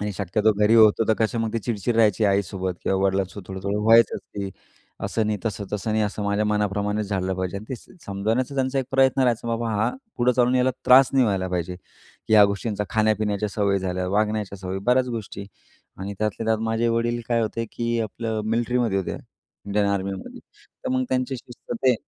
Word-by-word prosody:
आणि 105 0 -2
शक्यतो 105 +3 +1
घरी 105 +2 +3
होतो 110 0 +6
तर 110 - +5
कसं 110 +1 0
मग 110 -1 -2
ती 115 - 0
चिडचिड 115 0 -2
राहायची 110 -1 +3
आईसोबत 95 -2 0
किंवा 95 - +1
वडिलांसोबत 95 0 -1
थोडं-थोडं 95 +2 -3
व्हायचंच 115 0 +5
ते. 100 -1 -6 0.5
असं 110 -2 0
नाही 105 -1 -1
तसं, 105 -2 -2
तसं 105 +1 -2
नाही 110 - +2
असं 105 0 -4
माझ्या 100 +1 +1
मनाप्रमाणेच 105 0 -1
झालं 95 -2 -1
पाहिजे 95 +1 -3
आणि 100 - -7
ते - - -7 0.3
समजवण्याचा 110 +7 -1
त्यांचा 135 0 0
एक 135 - 0
प्रयत्न 135 0 +3
राहायचा, 120 -2 +1
बाबा 115 0 -1
हा, 105 - +1 0.3
पुढे 125 +1 +3
चालून 125 +1 +2
यायला 125 0 +3 0.2
त्रास 130 +1 +7
नाही 130 -2 +4
व्हायला 95 -3 0
पाहिजे 90 0 -3
की 95 - -11
ह्या 105 -1 +9
गोष्टींचा 105 +1 -2
खाण्यापिण्याच्या 105 -1 +1
सवयी 100 -1 +1
झाल्या, 90 -1 -2
वागण्याच्या 105 0 -1
सवयी 95 0 -4
बऱ्याच 125 +1 +3
गोष्टी. 105 -4 -6 0.5
आणि 100 +1 -5
त्यातल्या 110 +1 -2
त्यात 110 -1 +2
माझे 115 +1 +1
वडील 115 +1 0
काय 120 -1 +2
होते, 115 +1 -2
की 115 0 -1
आपलं 110 +1 -3
मिलिट्रीमध्ये 115 -2 +1
होते, 95 - -3 0.5
इंडियन 100 0 +1
आर्मीमध्ये 100 -1 -3 0.5
तर - - -1
मग 130 0 +1
त्यांच्या 130 +1 0
शिस्त 120 - -10
ते. 130 -1 +6
105 Hz, 190 wpm, -24 LUFS, 100-115 Hz, 0.5 s, ह्या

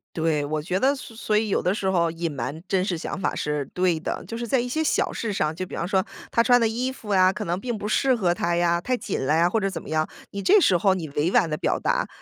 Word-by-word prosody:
对， 160 -3 0
我 155 +1 -2
觉 180 +4 -1
得 275 +5 +3
所 250 - -10
所 215 -2 +1
以 215 -1 0
有 - - +1
的 185 - +1
时 190 -4 0
候， 170 -3 +2
隐 165 -1 -3
瞒 140 +5 -5
真 190 -1 +1
实 175 -4 -1
想 190 - -5
法 - - -1
是 150 -1 -2
对 180 -3 +1
的。 - - -4
就 230 - -6
是 235 0 -4
在 250 +1 +2
一 250 - -4
些 315 +5 -1
小 310 - +1
事 220 -3 -3
上， 155 -4 0
就 185 +3 -4
比 - - -8
方 170 - -2
说 190 0 +1 0.3
他 230 - +3
穿 245 +1 +5
的 - - +4
衣 245 +3 -1
服 220 -6 -5
呀， 185 0 +5
可 - - -4
能 175 +2 -2
并 240 0 -3
不 205 - -6
适 255 +4 +2
合 185 -7 +1
他 170 0 -1
呀， 170 0 +2
太 255 +8 -1
紧 225 - -3
了 150 +4 +2
呀， 170 +2 +4
或 225 - +1
者 195 -1 0
怎 185 - -6
么 - - -10
样， 155 0 0 0.2
你 200 - -4
这 395 - +5
时 185 - +4
候 195 +1 +3
你 165 -5 -4
委 150 +5 0
婉 165 - +4
的 155 - -2
表 - - 0
达， - - 0
185 Hz, 320 characters per minute, -24 LUFS, 165-225 Hz, 0.3 s, 穿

